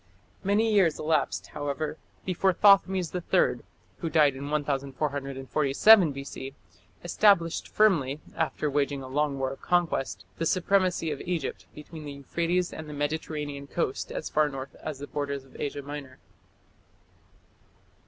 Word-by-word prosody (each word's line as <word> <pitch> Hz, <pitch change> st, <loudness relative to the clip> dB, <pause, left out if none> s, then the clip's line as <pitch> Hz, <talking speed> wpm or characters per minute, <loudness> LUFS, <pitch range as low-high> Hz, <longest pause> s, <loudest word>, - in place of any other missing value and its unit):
Many 215 Hz, +3 st, +2 dB
years 185 Hz, -7 st, +4 dB
elapsed, 155 Hz, +1 st, 0 dB
however, 150 Hz, +2 st, -3 dB, 0.3 s
before 185 Hz, +1 st, +2 dB
Thothmes 190 Hz, -2 st, +4 dB
III, 180 Hz, -1 st, +1 dB, 0.4 s
who 165 Hz, -, -2 dB
died 150 Hz, -4 st, +4 dB
in 140 Hz, +2 st, -6 dB
1447 140 Hz, +4 st, +2 dB
B.C., 140 Hz, 0 st, -7 dB, 0.5 s
established 175 Hz, -2 st, +3 dB
firmly, 155 Hz, -10 st, +2 dB, 0.2 s
after 160 Hz, -1 st, -1 dB
waging 140 Hz, -1 st, 0 dB
a -, -, -7 dB
long 145 Hz, +1 st, 0 dB
war 135 Hz, 0 st, -1 dB
of 135 Hz, -, -9 dB
conquest, 175 Hz, -6 st, 0 dB
the 165 Hz, -, +1 dB
supremacy 185 Hz, -2 st, +1 dB
of 145 Hz, -, -4 dB
Egypt 170 Hz, -6 st, -3 dB
between 155 Hz, +1 st, -10 dB
the 145 Hz, -, -6 dB
Euphrates 170 Hz, +6 st, -1 dB
and 155 Hz, -1 st, -7 dB
the -, -, -6 dB
Mediterranean 145 Hz, -1 st, -3 dB
coast 140 Hz, -4 st, -2 dB
as -, -, -4 dB
far 150 Hz, -1 st, +2 dB
north 135 Hz, 0 st, -7 dB
as 155 Hz, -3 st, -5 dB
the 140 Hz, -, -6 dB
borders 140 Hz, -2 st, -4 dB
of 135 Hz, -, -21 dB
Asia 145 Hz, 0 st, -3 dB
Minor. 140 Hz, -2 st, -8 dB
150 Hz, 135 wpm, -27 LUFS, 140-170 Hz, 0.5 s, years